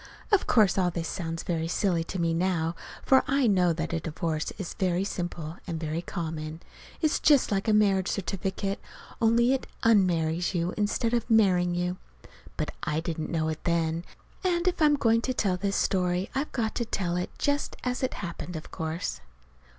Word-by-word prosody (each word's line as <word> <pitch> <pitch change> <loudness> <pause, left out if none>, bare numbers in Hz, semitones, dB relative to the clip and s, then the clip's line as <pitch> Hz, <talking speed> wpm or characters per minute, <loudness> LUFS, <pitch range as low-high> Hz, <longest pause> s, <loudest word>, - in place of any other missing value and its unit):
(Of 410 - +3
course 210 -5 +4
all 180 -1 +3
this 170 -1 -3
sounds 165 -2 -4
very 165 -3 -1
silly 175 -1 +1
to 190 - -5
me 165 -1 +1
now, 170 -1 0 0.3
for 265 -1 +5
I 275 -1 +2
know 185 -5 +4
that 165 +1 -3
a 165 - +1
divorce 160 0 -2
is 195 -4 -5
very 185 -1 0
simple 175 -4 -4
and 165 -3 -3
very 160 +1 -2
common. 160 -2 -5 0.4
It's 310 -2 +2
just 290 -7 +4
like 195 +1 0
a - - +4
marriage 200 -3 +3
certificate, 195 +1 -2 0.4
only 235 +3 +4
it 270 - -2 0.2
_un_marries 180 -5 +3
you 175 +1 0
instead 215 +2 0
of 235 0 0
marrying 180 -6 +4
you; 180 +1 -1 0.6
but - - -2
I 150 +1 -1
didn't 160 -1 -3
know 160 -2 0
it 160 0 -5
then. 165 -1 0 0.4
And 350 -1 +1
if 360 - +1
I'm 300 -1 +6
going 230 -4 +3
to 255 +1 -2
tell 195 -6 +1
this 200 +2 -1
story 180 0 +1
I've 275 +3 -2
got 225 -3 -1
to 235 - 0
tell 180 -5 -1
it 180 0 -1
just 285 0 0
as 250 0 -1
it 260 - -1
happened, 175 0 -6
of 155 - -7
course.) 160 - -3
180 Hz, 185 wpm, -28 LUFS, 165-220 Hz, 0.6 s, I'm